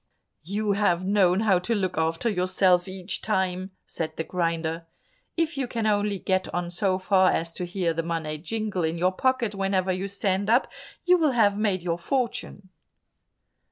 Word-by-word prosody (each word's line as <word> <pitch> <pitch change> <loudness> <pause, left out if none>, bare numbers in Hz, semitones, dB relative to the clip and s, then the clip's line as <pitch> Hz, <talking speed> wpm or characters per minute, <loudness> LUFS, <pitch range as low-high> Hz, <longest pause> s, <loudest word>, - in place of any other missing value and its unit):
"You 205 +5 -1
have 190 -3 +1
known 195 -1 +3
how 200 -5 +3
to 205 +6 -1
look 185 -3 -1
after 160 +6 0
yourself 185 -2 +2
each 185 +1 -5
time," 190 -3 -1 0.2
said 160 -1 -5
the 160 - -1
grinder. 165 -1 -2 0.5
"If 330 -3 0
you 260 - -1
can 230 -2 -3
only 205 -1 +1
get 185 +1 -1
on 175 0 -2
so 185 +1 +1
far 185 0 +3
as 165 0 -1
to 180 - -4
hear 175 -1 -1
the 165 - -1
money 160 -2 -3
jingle 210 0 -3
in 160 +1 -1
your 180 +2 +2
pocket 245 +1 0
whenever 195 -1 0
you 185 +2 -2
stand 200 0 -1
up, 240 +4 +4 0.4
you 360 0 +5
will 305 -5 +2
have 205 -4 +3
made 200 -4 0
your 170 -1 -1
fortune." 230 -3 -3
190 Hz, 175 wpm, -26 LUFS, 175-210 Hz, 0.5 s, you